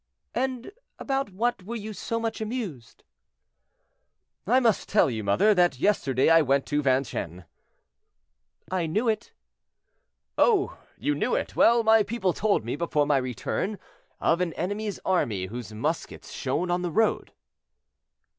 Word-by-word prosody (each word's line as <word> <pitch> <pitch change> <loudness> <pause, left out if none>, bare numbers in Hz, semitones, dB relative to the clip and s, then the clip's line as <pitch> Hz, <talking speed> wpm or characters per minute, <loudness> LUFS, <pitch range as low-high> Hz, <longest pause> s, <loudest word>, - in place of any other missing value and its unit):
"And 255 +3 -2 0.3
about 270 -4 -2
what 230 +3 -1
were 220 +6 -6
you 215 -1 -6
so 230 +3 -3
much 225 -1 -3
amused?" 210 - -5 1.4
"I 255 - +5
must 230 -5 +1
tell 205 -10 +3
you, 110 -2 -4
mother, 100 - +4
that 175 -7 +3
yesterday 135 - +2
I 165 0 +6
went 140 -1 +1
to 145 0 0
Vincennes." 130 - -1 1.3
"I 180 -3 0
knew 215 +10 0
it." 220 -1 -1 1.1
"Oh! 405 -5 +3 0.2
you 295 - 0
knew - - 0
it; - - -3
well, 235 0 +5
my 220 0 +5
people 205 -4 -1
told 205 - +1
me, 120 - -2
before 150 -2 0
my 145 -1 +3
return, 130 - -2 0.4
of 170 +2 +2
an 170 -3 -1
enemy's 205 +2 -3
army 110 - 0
whose 110 +2 -7
muskets 110 - -4
shone 175 +1 -2
on 175 0 +1
the 175 - -2
road." 220 +6 +1
185 Hz, 145 wpm, -26 LUFS, 135-225 Hz, 1.4 s, I